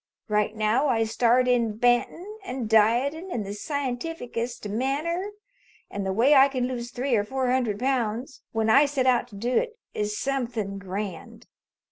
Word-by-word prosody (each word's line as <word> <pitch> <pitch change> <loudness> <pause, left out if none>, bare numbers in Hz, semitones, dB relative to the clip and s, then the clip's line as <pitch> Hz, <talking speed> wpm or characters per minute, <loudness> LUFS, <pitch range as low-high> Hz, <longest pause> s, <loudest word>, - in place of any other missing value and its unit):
Right 210 0 +1
now 220 +7 +2
I 230 -4 +2
start 240 +3 +2
in 235 -4 +1
bantin' 290 - 0
and 260 - -4
dietin' 240 - +2
in 235 - -2
the 200 0 -6
scientific 270 +3 -4
est 235 -1 -3
manner 300 - -1 0.6
an' 200 -1 -4
the 190 - 0
way 235 +9 +4
I 270 -1 +7
can 255 -3 -1
lose 240 -2 -4
three 255 +1 -1
or 205 - +2
four 260 +3 -1
hundred 245 -6 0
pounds 250 0 -2
when 225 -1 0
I 275 +6 +6
set 275 -2 -1
out 250 -1 +3
to 220 - -14
do 240 +5 -2
it 470 -1 0 0.2
is 210 0 -2
something 235 -7 -2
grand. 195 -2 -6
245 Hz, 170 wpm, -26 LUFS, 215-270 Hz, 0.6 s, I